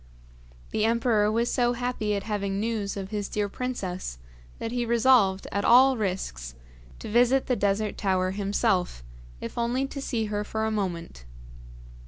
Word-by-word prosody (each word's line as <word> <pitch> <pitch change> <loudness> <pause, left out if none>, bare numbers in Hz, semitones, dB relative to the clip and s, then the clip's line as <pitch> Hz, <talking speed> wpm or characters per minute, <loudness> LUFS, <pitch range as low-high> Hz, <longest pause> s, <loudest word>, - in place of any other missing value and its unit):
The 215 - 0
emperor 225 -2 +2
was 235 +2 0
so 245 -1 +2
happy 240 -4 -1
at 200 - -3
having 200 -2 -2
news 215 -2 -2
of 195 0 -6
his 205 -2 -3
dear 210 -1 -1
princess, 195 - -4 0.4
that 225 - -4
he 245 0 -1
resolved, 230 -5 +3
at 200 - -1
all 260 +3 +6
risks, 180 - -3 0.4
to - - -8
visit 245 +4 +3
the 250 - +1
Desert 205 0 0
Tower 185 -2 +1
himself, 195 - 0 0.4
if 115 - -5
only 245 +3 0
to 275 +1 -6
see 230 -5 -1
her 210 0 -2
for 220 +1 -2
a 220 - 0
moment. 175 - -4
210 Hz, 160 wpm, -26 LUFS, 195-235 Hz, 0.4 s, all